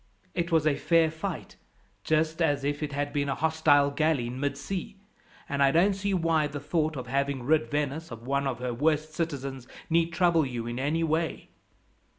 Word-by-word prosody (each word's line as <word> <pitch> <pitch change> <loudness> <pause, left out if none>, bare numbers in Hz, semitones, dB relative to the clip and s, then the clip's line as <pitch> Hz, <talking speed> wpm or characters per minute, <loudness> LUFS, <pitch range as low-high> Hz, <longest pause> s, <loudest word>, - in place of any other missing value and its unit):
It 170 0 -2
was 160 -2 +3
a 150 -2 +3
fair 165 +2 +3
fight, 160 +2 -6 0.5
just 160 +1 +1
as 145 -4 +2
if 145 +1 -1
it 150 -1 -2
had 145 0 -2
been 140 -1 0
a 135 - 0
hostile 155 -3 +3
galley 155 -3 +1
in 125 +2 -5
mid 140 +1 -1
sea; 195 +1 -5 0.5
and 140 0 -2
I 140 - +6
don't 175 +8 +4
see 200 +1 -2
why 165 -4 +2
the 145 0 -6
thought 155 +2 -1
of 125 - -5
having 140 +1 -1
rid 155 +4 +2
Venice 150 +2 -2
of 115 -2 -9
one 140 +1 0
of 130 - -2
her 125 -1 -3
worst 155 +4 0
citizens 135 -6 -4 0.2
need 165 0 +3
trouble 170 -2 +3
you 120 -4 -4
in 120 +1 -4
any 150 +5 0
way." 160 0 -1
150 Hz, 195 wpm, -28 LUFS, 140-160 Hz, 0.5 s, I